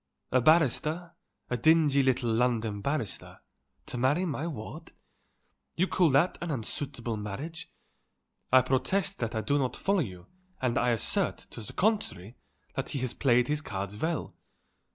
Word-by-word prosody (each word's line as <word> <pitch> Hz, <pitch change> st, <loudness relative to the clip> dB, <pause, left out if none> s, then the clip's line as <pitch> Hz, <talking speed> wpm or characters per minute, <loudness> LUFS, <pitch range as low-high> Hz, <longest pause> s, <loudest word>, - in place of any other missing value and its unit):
A 130 Hz, -, +4 dB
barrister, 160 Hz, +3 st, +2 dB, 0.4 s
a 125 Hz, -, +1 dB
dingy 150 Hz, +1 st, +4 dB
little 130 Hz, -3 st, +1 dB
London 115 Hz, -3 st, +1 dB
barrister, 140 Hz, -5 st, -3 dB, 0.4 s
to 125 Hz, -, -5 dB
marry 145 Hz, +9 st, +2 dB
my 160 Hz, -1 st, -2 dB
ward? 110 Hz, -10 st, -7 dB, 0.8 s
You 185 Hz, +3 st, +2 dB
call 180 Hz, -4 st, +3 dB
that 145 Hz, +6 st, +3 dB
an 175 Hz, -, -3 dB
unsuitable 120 Hz, -3 st, -3 dB
marriage? 145 Hz, -, -6 dB, 0.8 s
I 130 Hz, 0 st, +7 dB
protest 135 Hz, +9 st, 0 dB
that 115 Hz, -1 st, -2 dB
I 110 Hz, -, 0 dB
do 145 Hz, +5 st, +1 dB
not 130 Hz, -3 st, -1 dB
follow 200 Hz, 0 st, +1 dB
you 90 Hz, -, -4 dB, 0.3 s
and 125 Hz, -2 st, 0 dB
I 125 Hz, -, +2 dB
assert, 115 Hz, -4 st, +1 dB
to 120 Hz, -, -7 dB
the 105 Hz, -, -8 dB
contrary, 180 Hz, -, 0 dB, 0.4 s
that -, -, -3 dB
he 140 Hz, -, -3 dB
has 130 Hz, -2 st, -2 dB
played 125 Hz, -2 st, +3 dB
his 150 Hz, 0 st, -1 dB
cards 100 Hz, -5 st, -5 dB
well. 160 Hz, +7 st, -2 dB
130 Hz, 155 wpm, -29 LUFS, 115-160 Hz, 0.8 s, I